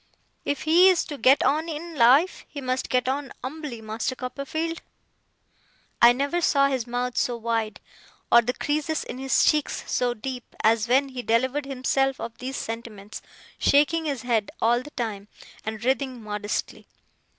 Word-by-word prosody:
If 285 - -2
he 345 +4 +6
is 365 -3 +2
to 290 - -7
get 270 +2 +5
on 315 +3 +1
in 325 +2 -6
life, 275 +8 +4
he 290 - -7
must 255 -1 -2
get 250 0 +1
on 275 +1 -2
umbly, 265 -4 -6
Master 225 +5 -3
Copperfield!' 285 +6 -4 1.2
I 235 - +9
never 280 +7 -1
saw 275 -4 +3
his 260 -4 -2
mouth 245 +1 -2
so 240 -1 0
wide, 225 -2 -2 0.5
or 235 - +8
the 245 +2 -2
creases 305 +1 -1
in 255 - -7
his 265 0 +2
cheeks 300 -2 +1
so 245 -1 +1
deep, 250 +2 -7
as 225 +1 +3
when 270 +3 +3
he 255 -1 -5
delivered 260 +5 0
himself 270 0 0
of 230 0 -6
these 265 +2 -4
sentiments: 225 -3 -7 0.4
shaking 315 +3 +3
his 275 -5 -3
head 230 -4 0
all 240 +2 +3
the 295 - -10
time, 210 -4 -3 0.4
and 220 +1 -5
writhing 260 -2 -1
modestly. 210 0 -4
255 Hz, 160 wpm, -25 LUFS, 235-285 Hz, 1.2 s, I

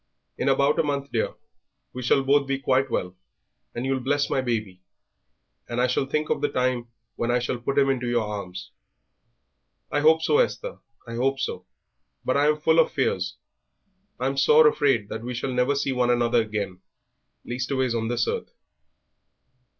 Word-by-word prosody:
In - - 0
about 140 +2 +3
a - - +4
month, 140 -1 -2
dear, 115 - -1 0.6
we 125 - -5
shall 130 +2 +2
be 140 +2 +4 0.2
both 135 - -9
quite 135 0 +2
well, 90 -5 -2 0.6
and 120 +2 -3
you'll 135 0 0
bless 145 +3 0
my 135 - +2
baby, 110 -7 -3 0.9
and 120 0 -2
I 125 - +4
shall 130 +1 0
think 150 +2 -1
of - - 0
the 145 - +1
time 125 -2 0 0.3
when 120 - -1
I 120 - +3
shall 125 0 -2
put 135 +3 -2
him 140 -1 +5
into 125 -3 0
your 120 -1 +1
arms." 100 -3 -6 1.2
"I 145 - +1
hope 160 +2 +4
so, 445 - +3
Esther; - - -1 0.3
I 115 - -8
hope 135 +2 +1
so, 135 - -4 0.6
but 130 - +1
I 145 +1 +3
am 150 0 +3
full 160 +2 +3
of 165 - +5
fears. 95 - -1 0.8
I'm 135 +2 -1
sore 150 +3 +6
afraid 135 -8 +2
that 110 - -5
we 125 +1 -5
shall 130 +2 -3
never 125 +3 +2
see 140 -1 0
one 125 -1 +1
another 120 -1 +3
again 105 -4 -4 0.7
leastways 130 0 -1
on 115 -1 -1
this 120 -1 0
earth." - - -3
130 Hz, 180 wpm, -25 LUFS, 120-140 Hz, 1.2 s, sore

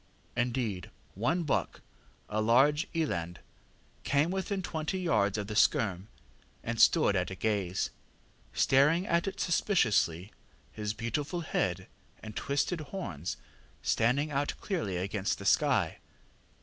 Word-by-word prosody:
Indeed, 120 -6 -1 0.2
one 125 - 0
buck 150 - -1 0.5
a 110 +1 -1
large 135 +8 +4
eland 85 - -1 0.7
came 145 +4 +2
within 190 0 -2
twenty 160 +2 -2
yards 110 - +1
of 105 - -2
the 105 - -6
skerm, 100 -3 +2 0.6
and 115 0 -1
stood 155 -11 +5
at 90 -1 +1
gaze, 100 -4 -1 0.6
staring 150 +7 +3
at 170 +2 +1
it 195 0 -4
suspiciously, 110 - +1 0.4
his 105 -1 -4
beautiful 145 +9 -2
head 160 - -1 0.4
and 110 -1 -8
twisted 145 +4 -1
horns 100 - -5 0.5
standing 140 +7 +2
out 145 +1 -1
clearly 155 - -2
against 100 +2 -1
the 100 - -9
sky. 120 - +2
125 Hz, 120 wpm, -30 LUFS, 100-160 Hz, 0.7 s, stood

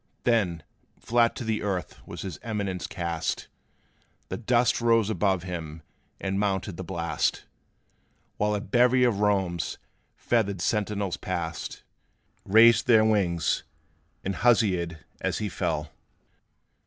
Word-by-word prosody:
Then, 95 -9 +1 0.4
flat 115 0 +2
to - - -5
the 110 -1 -1
earth 95 -3 -3
was - - -7
his 90 -6 -6
Eminence 100 -5 -3
cast! 85 -2 -3 0.8
The - - -3
dust 120 +1 +2
rose 115 -2 +3
above 95 -4 +1
him, 80 -3 -6 0.4
and 95 0 -2
mounted 100 -2 -1
the 95 - -6
blast, 85 -1 -1 0.9
While 105 0 +1
a 100 - -2
bevy 125 +4 +3
of 115 -5 +2
Rome's 95 -5 0 0.4
feathered 100 -5 0
sentinels 100 -1 -1
passed, 85 -3 -4 0.6
Raised 115 +5 +6
their 110 -3 +6
wings, 95 -6 +1 0.6
and 95 0 -3
huzzaed 95 -9 +2 0.2
as - - -1
he 105 -1 -2
fell! 75 -4 -2
100 Hz, 120 wpm, -27 LUFS, 90-110 Hz, 0.9 s, Raised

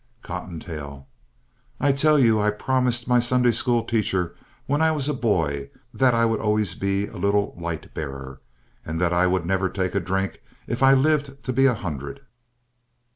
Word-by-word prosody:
COTTONTAIL 80 -6 -7 0.7
I 140 - +3
tell 150 +2 +4
you 115 -5 +4
I 105 - +2
promised 125 +2 0
my 125 -1 +4
Sunday 125 0 +3
school 120 0 +1
teacher 95 -7 -1 0.3
when 145 +2 0
I 160 - +4
was 145 -3 -1
a 150 - 0
boy 80 - 0 0.2
that 130 -2 +3
I 115 0 +3
would 115 -1 0
always 105 -4 +1
be 100 +1 -1
a 105 - -10
Little 100 +2 0
Light 85 -2 -6
Bearer, 70 -3 -7 0.4
and 80 +1 -4
that 90 0 +1
I 90 +1 +3
would 90 -2 0
never 95 +1 0
take 95 -1 -2
a 100 - +1
drink 95 +2 -2 0.2
if 120 - -4
I 135 0 +7
lived 140 -1 +1
to 130 - -2
be 135 +2 +4
a 125 - +2
hundred. 85 - -6
105 Hz, 180 wpm, -24 LUFS, 90-125 Hz, 0.7 s, I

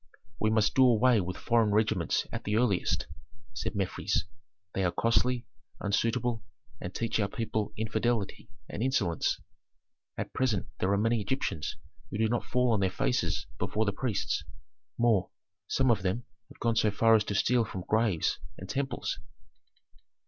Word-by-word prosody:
"We 110 - +2
must 110 -1 +3
do 130 - +5
away 120 -2 +5
with 90 0 -4
foreign 115 -3 +2
regiments 105 -5 +1
at - - -4
the 105 - 0
earliest," 110 -6 +1 0.5
said 115 - -3
Mefres. 95 -2 0 0.5
"They 95 - 0
are 90 - +2
costly, 120 +3 +1 0.3
unsuitable, 115 +2 0 0.4
and 90 - -4
teach 115 -1 0
our 100 - +2
people 110 -1 -2
infidelity 110 0 -1 0.2
and - - -5
insolence. 100 - +1 0.8
At - - -4
present 120 -7 +1
there 95 - +1
are 100 - +3
many 115 +2 +2
Egyptians 100 - -2 0.3
who - - -4
do 110 0 +3
not 120 +1 0
fall 125 -1 +2
on 110 - +2
their 95 -1 +2
faces 130 +6 0
before 110 +1 0
the 100 - 0
priests; 120 -2 -1 0.5
more, 110 -6 +3 0.4
some 130 -2 +3
of 110 - +2
them 95 +6 -1 0.3
have - - -15
gone 115 -1 +1
so 110 -1 +4
far 115 +2 +4
as 110 -1 +5
to 100 - -2
steal 120 +4 +3
from 95 -4 -6
graves 110 -7 +1 0.2
and 95 - -8
temples." 135 -8 -2
110 Hz, 160 wpm, -30 LUFS, 100-120 Hz, 0.8 s, do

